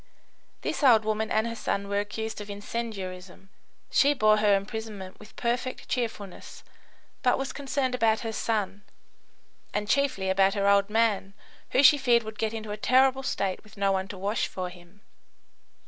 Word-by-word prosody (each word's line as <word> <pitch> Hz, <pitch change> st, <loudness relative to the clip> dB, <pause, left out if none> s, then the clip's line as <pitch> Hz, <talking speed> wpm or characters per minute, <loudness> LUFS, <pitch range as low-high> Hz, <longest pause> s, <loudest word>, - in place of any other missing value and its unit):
This -, -, -3 dB
old 230 Hz, -6 st, +6 dB
woman 215 Hz, 0 st, -1 dB
and 220 Hz, +1 st, +1 dB
her 230 Hz, -, -3 dB
son 200 Hz, -2 st, -2 dB
were 200 Hz, 0 st, 0 dB
accused 220 Hz, +1 st, -4 dB
of 205 Hz, -, -9 dB
incendiarism. 195 Hz, -3 st, -6 dB, 0.4 s
She 285 Hz, +1 st, +4 dB
bore 215 Hz, -3 st, +4 dB
her 210 Hz, -1 st, +4 dB
imprisonment 200 Hz, -1 st, -5 dB
with 215 Hz, +1 st, -15 dB
perfect 245 Hz, +1 st, -2 dB
cheerfulness, 215 Hz, -6 st, -5 dB, 0.6 s
but 250 Hz, -, +3 dB
was 270 Hz, 0 st, -4 dB
concerned 275 Hz, -2 st, -1 dB
about 225 Hz, -3 st, +2 dB
her 225 Hz, -, -3 dB
son, 210 Hz, -3 st, -2 dB, 0.9 s
and 210 Hz, 0 st, -1 dB
chiefly 260 Hz, -6 st, +1 dB
about 195 Hz, +1 st, +3 dB
her 200 Hz, -1 st, +1 dB
"old 200 Hz, 0 st, +4 dB
man," 210 Hz, -3 st, +1 dB, 0.3 s
who 270 Hz, -, +3 dB
she 290 Hz, +1 st, +8 dB
feared 240 Hz, -3 st, +3 dB
would 220 Hz, 0 st, -9 dB
get 220 Hz, -1 st, 0 dB
into 220 Hz, -2 st, -6 dB
a 210 Hz, -, -4 dB
terrible 260 Hz, +4 st, +3 dB
state 200 Hz, -8 st, -2 dB
with 215 Hz, -1 st, -18 dB
no 200 Hz, 0 st, +2 dB
one 190 Hz, 0 st, -1 dB
to 195 Hz, -, -8 dB
wash 200 Hz, +4 st, -1 dB
for 185 Hz, -1 st, -5 dB
him. 180 Hz, +3 st, -16 dB
215 Hz, 170 wpm, -27 LUFS, 200-235 Hz, 0.9 s, she